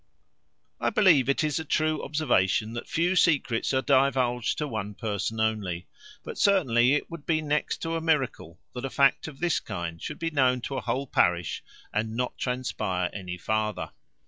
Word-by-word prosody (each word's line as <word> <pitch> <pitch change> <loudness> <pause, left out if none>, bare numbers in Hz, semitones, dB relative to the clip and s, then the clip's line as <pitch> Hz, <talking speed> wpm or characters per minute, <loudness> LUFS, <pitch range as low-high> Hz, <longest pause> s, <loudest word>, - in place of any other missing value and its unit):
I - - +1
believe 165 - +4
it 140 - +2
is 150 -1 0
a - - -3
true 155 0 0
observation, 110 -8 +1
that 120 - -6
few 175 +3 +1
secrets 135 -9 +2
are 130 -1 +1
divulged 130 -3 +2
to 150 - -2
one 105 -5 -4
person 110 0 -3
only; 105 -6 -1 0.4
but - - -7
certainly, 135 - +4
it 150 - -3
would 165 -3 -8
be 160 -2 +2
next 150 -1 -1
to 165 0 -2
a 165 - -2
miracle 135 - -1
that 125 - -6
a 135 - -2
fact 140 +3 +3
of 145 -3 -10
this 175 -2 +1
kind 85 -4 -6
should 150 - -5
be 165 0 -2
known 130 -4 +2
to 135 - -4
a 130 - -2
whole 135 +2 -2
parish, 85 - +1 0.3
and 110 +1 -1
not 125 0 -1
transpire 105 -8 -2
any 90 -3 -6
farther. 110 0 -2
130 Hz, 180 wpm, -27 LUFS, 110-150 Hz, 0.4 s, believe